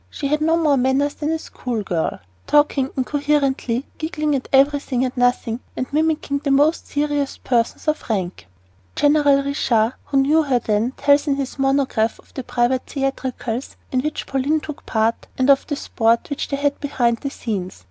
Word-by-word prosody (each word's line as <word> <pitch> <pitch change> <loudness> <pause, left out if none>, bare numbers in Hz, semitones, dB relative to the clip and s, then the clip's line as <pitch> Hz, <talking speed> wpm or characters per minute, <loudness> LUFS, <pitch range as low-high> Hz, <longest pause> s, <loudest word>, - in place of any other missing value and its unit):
She 280 - -4
had 300 +1 +1
no 325 +2 +3
more 300 -4 +3
manners 265 +3 +1
than 300 - -3
a 320 - +1
school 245 -7 -5
girl 170 - -2 0.3
talking 290 -2 +3
incoherently, 275 -2 0
giggling 305 -2 -1
at 260 - -4
everything 275 -2 +3
and 255 - -4
nothing, 245 -2 +1 0.2
and 255 - -1
mimicking 305 -2 0
the 280 - -3
most 290 +4 +3
serious 290 -1 -1
persons 235 +4 -1
of 305 -4 -1
rank. 185 - -2 0.5
General 290 -1 +4
de 280 - -3
Ricard, 230 -4 +1
who 275 - -1
knew 290 +4 +4
her 275 -5 +1
then, 225 +2 0
tells 285 +1 +3
in 280 - +2
his 275 0 -4
monograph 270 -5 +1
of - - -22
the 265 - -5
private 245 +1 +1
theatricals 265 -3 -3
in 255 - +1
which 305 +2 -3
Pauline 280 +3 0
took 300 -1 -9
part, 220 +1 0
and 260 +2 +4
of 275 - +2
the 290 - -1
sport 230 -1 0
which 285 - -2
they 280 - -2
had 285 0 0
behind 240 -5 0
the 275 - -3
scenes. 200 - -5
275 Hz, 180 wpm, -21 LUFS, 245-290 Hz, 0.5 s, General